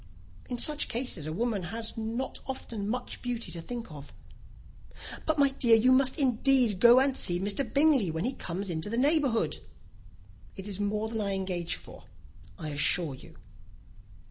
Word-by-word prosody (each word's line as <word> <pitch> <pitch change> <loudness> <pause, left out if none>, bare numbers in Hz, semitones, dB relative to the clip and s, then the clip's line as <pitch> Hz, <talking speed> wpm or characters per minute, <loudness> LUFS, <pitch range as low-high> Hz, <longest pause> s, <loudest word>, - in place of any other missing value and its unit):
"In 245 - -3
such 300 +4 +1
cases, 230 - -3
a - - -3
woman 220 +3 -1
has 225 +5 -4
not 225 +4 -4
often 225 -6 -5
much 250 +3 -4
beauty 240 -7 -3
to 165 0 -5
think 235 +1 -7
of." 145 -2 -10 1.2
"But, 315 -1 +1
my 280 -1 +5
dear, 240 -4 +4
you 235 +3 +4
must 260 0 +3
indeed 255 -5 +2
go 240 +3 +8
and 270 0 +2
see 175 -7 +2
Mr. 200 +7 0
Bingley 280 - +4
when 160 +4 -2
he 260 - 0
comes 185 -1 -5
into 160 +4 -3
the 230 - -2
neighbourhood." 260 - +2 1.0
"It 195 0 -7
is 200 -1 -4
more 210 +1 -1
than 220 -1 -3
I 200 -1 -1
engage 185 -3 -2
for, - - -13 0.5
I 155 - -5
assure 145 +1 +2
you." 130 - -14
225 Hz, 170 wpm, -29 LUFS, 185-255 Hz, 1.2 s, go